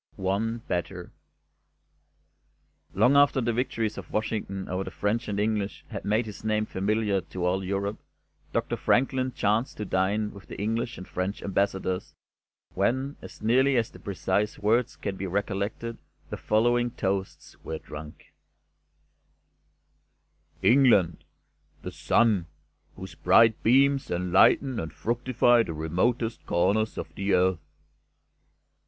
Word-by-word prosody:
ONE 110 Hz, +5 st, -2 dB
BETTER 90 Hz, 0 st, -3 dB, 1.8 s
Long 135 Hz, +3 st, +4 dB
after 140 Hz, -1 st, +5 dB
the 120 Hz, -1 st, 0 dB
victories 115 Hz, -2 st, -2 dB
of -, -, -11 dB
Washington 105 Hz, -3 st, -3 dB
over 95 Hz, +1 st, -2 dB
the -, -, -6 dB
French 110 Hz, +4 st, -2 dB
and 100 Hz, -1 st, -2 dB
English 105 Hz, -1 st, -1 dB
had -, -, -6 dB
made 110 Hz, +3 st, +1 dB
his 105 Hz, -2 st, -9 dB
name 110 Hz, 0 st, 0 dB
familiar 105 Hz, 0 st, 0 dB
to 90 Hz, +1 st, -5 dB
all 95 Hz, +2 st, 0 dB
Europe, 100 Hz, +2 st, -2 dB, 0.5 s
Doctor -, -, -1 dB
Franklin 130 Hz, 0 st, +1 dB
chanced 110 Hz, +2 st, 0 dB
to 105 Hz, -, -4 dB
dine 100 Hz, +3 st, 0 dB
with 100 Hz, -1 st, -13 dB
the -, -, -9 dB
English 115 Hz, +4 st, -2 dB
and 95 Hz, -, -9 dB
French 95 Hz, +3 st, -3 dB
Ambassadors, 95 Hz, -1 st, -1 dB, 0.6 s
when, 130 Hz, +8 st, 0 dB
as -, -, -12 dB
nearly 130 Hz, +4 st, +3 dB
as 115 Hz, -1 st, 0 dB
the -, -, -14 dB
precise 100 Hz, +1 st, -1 dB
words 115 Hz, +3 st, +1 dB
can 100 Hz, -2 st, -5 dB
be 95 Hz, -, -4 dB
recollected, 100 Hz, +4 st, -3 dB, 0.3 s
the -, -, -3 dB
following 120 Hz, +3 st, +2 dB
toasts 95 Hz, -5 st, -3 dB
were 80 Hz, -, -4 dB
drunk: 75 Hz, 0 st, -11 dB, 2.3 s
"England' 115 Hz, -10 st, +4 dB, 0.6 s
The -, -, -5 dB
Sun, 105 Hz, -8 st, +2 dB, 0.5 s
whose -, -, -9 dB
bright 115 Hz, -1 st, +4 dB
beams 135 Hz, +3 st, +3 dB
enlighten 95 Hz, +9 st, +3 dB
and 80 Hz, -, -4 dB
fructify 120 Hz, +1 st, +2 dB
the 85 Hz, -, -3 dB
remotest 110 Hz, +9 st, -1 dB
corners 110 Hz, +5 st, +1 dB
of -, -, -6 dB
the 100 Hz, -1 st, +1 dB
earth." 90 Hz, -1 st, +2 dB
105 Hz, 130 wpm, -27 LUFS, 95-115 Hz, 2.3 s, after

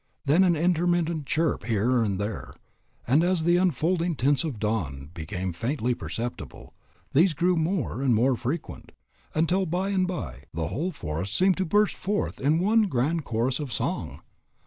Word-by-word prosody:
Then 155 Hz, +7 st, +5 dB
an 175 Hz, -2 st, +4 dB
intermittent 170 Hz, -2 st, +1 dB
chirp 155 Hz, -7 st, 0 dB
here 120 Hz, +2 st, +2 dB
and 100 Hz, -4 st, 0 dB
there. 105 Hz, +1 st, -4 dB, 0.5 s
And 140 Hz, +7 st, +3 dB
as 180 Hz, -2 st, +1 dB
the 175 Hz, +1 st, +4 dB
unfolding 175 Hz, 0 st, +1 dB
tints 140 Hz, +4 st, +2 dB
of 160 Hz, -4 st, -2 dB
the -, -, -11 dB
dawn 80 Hz, -10 st, -3 dB
became 90 Hz, +3 st, -4 dB
faintly 125 Hz, -, -1 dB
perceptible, 115 Hz, +5 st, -6 dB, 0.4 s
these 165 Hz, +3 st, +4 dB
grew 180 Hz, +5 st, +2 dB
more 160 Hz, -, -1 dB
and 130 Hz, -4 st, +3 dB
more 125 Hz, +4 st, +3 dB
frequent, 135 Hz, +8 st, -5 dB, 0.4 s
until 180 Hz, +4 st, +2 dB
by 180 Hz, +4 st, -1 dB
and 185 Hz, -2 st, +1 dB
by 70 Hz, -, -5 dB
the 80 Hz, -1 st, -2 dB
whole 165 Hz, +8 st, -2 dB
forest 90 Hz, -, -4 dB
seemed 185 Hz, 0 st, +3 dB
to 190 Hz, -, 0 dB
burst 210 Hz, +4 st, +3 dB
forth 205 Hz, +2 st, -2 dB
in 145 Hz, +4 st, +3 dB
one 210 Hz, +4 st, +3 dB
grand 150 Hz, +2 st, 0 dB
chorus 120 Hz, +4 st, 0 dB
of 145 Hz, -4 st, -5 dB
song. 105 Hz, -, -3 dB
150 Hz, 170 wpm, -26 LUFS, 115-175 Hz, 0.5 s, Then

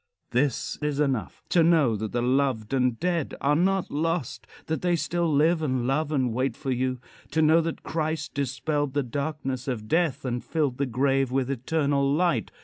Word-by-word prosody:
This 135 Hz, +3 st, 0 dB
is 150 Hz, -1 st, -1 dB
enough: 130 Hz, -10 st, -1 dB
To 175 Hz, -, +4 dB
know 160 Hz, -8 st, +4 dB
that 110 Hz, 0 st, -4 dB
the 120 Hz, 0 st, -1 dB
loved 130 Hz, -3 st, +1 dB
and 125 Hz, -3 st, +1 dB
dead 170 Hz, -4 st, -1 dB
are 145 Hz, +1 st, +2 dB
not 190 Hz, +3 st, +1 dB
lost; 145 Hz, -6 st, -2 dB, 0.2 s
that 160 Hz, -, -2 dB
they 175 Hz, -1 st, +2 dB
still 170 Hz, 0 st, 0 dB
live 160 Hz, +3 st, +3 dB
and 130 Hz, -5 st, 0 dB
love 145 Hz, +4 st, 0 dB
and 130 Hz, -6 st, +1 dB
wait 130 Hz, 0 st, -1 dB
for 135 Hz, -3 st, -3 dB
you. 130 Hz, 0 st, -1 dB, 0.3 s
To 160 Hz, -, +1 dB
know 160 Hz, +2 st, +5 dB
that 165 Hz, 0 st, -4 dB
Christ 155 Hz, -2 st, -2 dB
dispelled 140 Hz, +1 st, -1 dB
the 145 Hz, -, +2 dB
darkness 135 Hz, 0 st, -3 dB
of 115 Hz, -5 st, -3 dB
death 160 Hz, -1 st, +1 dB
and 125 Hz, -1 st, -2 dB
filled 145 Hz, -6 st, -1 dB
the 140 Hz, -, +1 dB
grave 135 Hz, +1 st, +1 dB
with 135 Hz, 0 st, 0 dB
eternal 140 Hz, +1 st, +1 dB
light. 150 Hz, -, +1 dB
140 Hz, 185 wpm, -26 LUFS, 130-160 Hz, 0.3 s, know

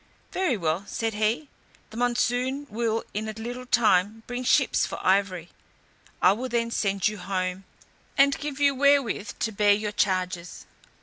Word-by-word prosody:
"Very 360 Hz, -, 0 dB
well," 165 Hz, +1 st, -1 dB
said 225 Hz, -1 st, -2 dB
he, 220 Hz, +8 st, 0 dB, 0.4 s
"the -, -, -11 dB
monsoon 245 Hz, +3 st, 0 dB
will 225 Hz, 0 st, -1 dB
in 215 Hz, +1 st, -3 dB
a -, -, -4 dB
little 245 Hz, +3 st, -7 dB
time 215 Hz, -2 st, +2 dB
bring 245 Hz, +1 st, -4 dB
ships -, -, +3 dB
for -, -, -3 dB
ivory. 185 Hz, -3 st, +1 dB, 0.7 s
I 180 Hz, -, +7 dB
will 245 Hz, +6 st, -3 dB
then 230 Hz, -1 st, 0 dB
send 195 Hz, -4 st, +1 dB
you 210 Hz, 0 st, -4 dB
home, 185 Hz, 0 st, -3 dB, 0.5 s
and 280 Hz, 0 st, +5 dB
give 290 Hz, -1 st, -5 dB
you 285 Hz, -1 st, +4 dB
wherewith 275 Hz, -6 st, +2 dB
to 225 Hz, -, -1 dB
bear 205 Hz, 0 st, +4 dB
your 210 Hz, 0 st, -2 dB
charges." 185 Hz, -3 st, -2 dB
220 Hz, 160 wpm, -26 LUFS, 195-245 Hz, 0.7 s, I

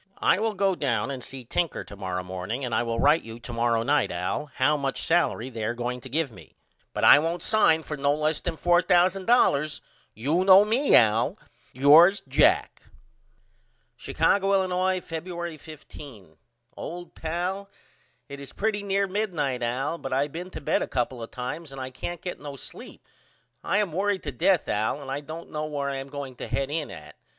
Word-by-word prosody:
I -, -, +3 dB
will 220 Hz, -1 st, -1 dB
go 195 Hz, 0 st, +2 dB
down 125 Hz, -, -1 dB
and 130 Hz, -2 st, -6 dB
see 130 Hz, -2 st, -9 dB
Tinker 170 Hz, +7 st, -1 dB
to 100 Hz, -, -12 dB
morrow 95 Hz, -2 st, -4 dB
morning 95 Hz, +8 st, -4 dB
and 120 Hz, -, -4 dB
I -, -, +2 dB
will 115 Hz, -1 st, -2 dB
write 150 Hz, +5 st, +4 dB
you 115 Hz, +1 st, -10 dB
to 120 Hz, -, -8 dB
morrow 115 Hz, -1 st, +1 dB
night 145 Hz, +4 st, +1 dB
Al 90 Hz, +11 st, -3 dB
how 150 Hz, +4 st, +3 dB
much 140 Hz, -2 st, -3 dB
salery 130 Hz, -7 st, 0 dB
they 110 Hz, -1 st, -4 dB
are 115 Hz, +2 st, -1 dB
going 125 Hz, +1 st, -4 dB
to 130 Hz, -, -10 dB
give 150 Hz, 0 st, -1 dB
me. -, -, -16 dB, 0.4 s
But -, -, -4 dB
I 145 Hz, -, +9 dB
won't 165 Hz, +3 st, -2 dB
sign 165 Hz, -8 st, +3 dB
for 150 Hz, -, -5 dB
no 140 Hz, 0 st, +1 dB
less 155 Hz, 0 st, 0 dB
than 170 Hz, -2 st, -4 dB
$4000. 175 Hz, -, +3 dB, 0.3 s
You 145 Hz, -, 0 dB
know 190 Hz, +1 st, +8 dB
me 245 Hz, +7 st, +3 dB
Al. 110 Hz, 0 st, +4 dB, 0.3 s
Yours, 155 Hz, +9 st, +6 dB
JACK. -, -, +2 dB, 1.1 s
Chicago, 200 Hz, 0 st, +1 dB
Illinois, 185 Hz, -1 st, +1 dB
Febuery 170 Hz, -1 st, -6 dB
15. 140 Hz, -, -12 dB, 0.4 s
OLD 175 Hz, +1 st, -8 dB
PAL: 180 Hz, +5 st, -3 dB, 0.6 s
It 140 Hz, 0 st, -9 dB
is 140 Hz, -, -9 dB
pretty 210 Hz, 0 st, -1 dB
near 200 Hz, 0 st, 0 dB
midnight 175 Hz, -11 st, -2 dB
Al 130 Hz, +7 st, -2 dB
but 135 Hz, -, -6 dB
I 135 Hz, +2 st, +1 dB
been 170 Hz, +5 st, -7 dB
to -, -, -8 dB
bed -, -, +1 dB
a -, -, -2 dB
couple 125 Hz, -1 st, -2 dB
of 115 Hz, -, -7 dB
times 135 Hz, +5 st, -6 dB
and 135 Hz, -, -9 dB
I 130 Hz, 0 st, -5 dB
can't 175 Hz, +6 st, -6 dB
get 180 Hz, -, -5 dB
no 145 Hz, -1 st, -8 dB
sleep. -, -, -9 dB, 0.6 s
I 200 Hz, -, 0 dB
am 205 Hz, -4 st, +1 dB
worried 195 Hz, +2 st, -1 dB
to 145 Hz, -, -4 dB
death 160 Hz, +7 st, +2 dB
Al 110 Hz, +7 st, -1 dB
and 135 Hz, -2 st, -8 dB
I 140 Hz, -, -2 dB
don't 155 Hz, +3 st, -9 dB
know 155 Hz, 0 st, -3 dB
where 140 Hz, -2 st, -3 dB
I 135 Hz, -, -3 dB
am 135 Hz, +1 st, -7 dB
going 135 Hz, -3 st, -7 dB
to -, -, -6 dB
head 140 Hz, 0 st, -2 dB
in 155 Hz, -1 st, -2 dB
at. 75 Hz, 0 st, -11 dB
150 Hz, 195 wpm, -26 LUFS, 125-175 Hz, 1.1 s, I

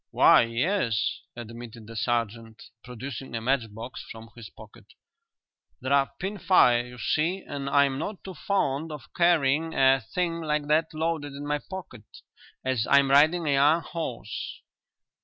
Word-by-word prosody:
"Why, -, -, +6 dB
yes," 115 Hz, -, 0 dB, 0.2 s
admitted 115 Hz, -1 st, -9 dB
the 115 Hz, +1 st, -11 dB
sergeant, 115 Hz, -1 st, -2 dB, 0.2 s
producing 125 Hz, 0 st, -7 dB
a 115 Hz, -, -3 dB
matchbox 115 Hz, -1 st, -2 dB
from 115 Hz, 0 st, -11 dB
his 115 Hz, -3 st, -10 dB
pocket. -, -, -15 dB, 0.9 s
"They're 135 Hz, +1 st, +2 dB
pin 195 Hz, +2 st, -4 dB
fire, 125 Hz, -10 st, +4 dB
you 125 Hz, 0 st, -12 dB
see, 170 Hz, +9 st, 0 dB
and 140 Hz, -1 st, -4 dB
I'm 140 Hz, -1 st, +3 dB
not 205 Hz, +5 st, -5 dB
too 190 Hz, -, -7 dB
fond 160 Hz, -5 st, -1 dB
of 150 Hz, -2 st, -10 dB
carrying 165 Hz, -2 st, +2 dB
a 135 Hz, 0 st, +4 dB
thing 170 Hz, +8 st, -2 dB
like 150 Hz, -2 st, -1 dB
that 155 Hz, +2 st, +3 dB
loaded 155 Hz, -3 st, -2 dB
in 140 Hz, +1 st, -7 dB
my 145 Hz, 0 st, -1 dB
pocket 180 Hz, -, -9 dB, 0.6 s
as 130 Hz, -4 st, 0 dB
I'm 140 Hz, -1 st, +5 dB
riding 155 Hz, +5 st, +5 dB
a -, -, +2 dB
young 145 Hz, +4 st, +4 dB
horse." 125 Hz, -, -6 dB
140 Hz, 145 wpm, -26 LUFS, 120-160 Hz, 0.9 s, Why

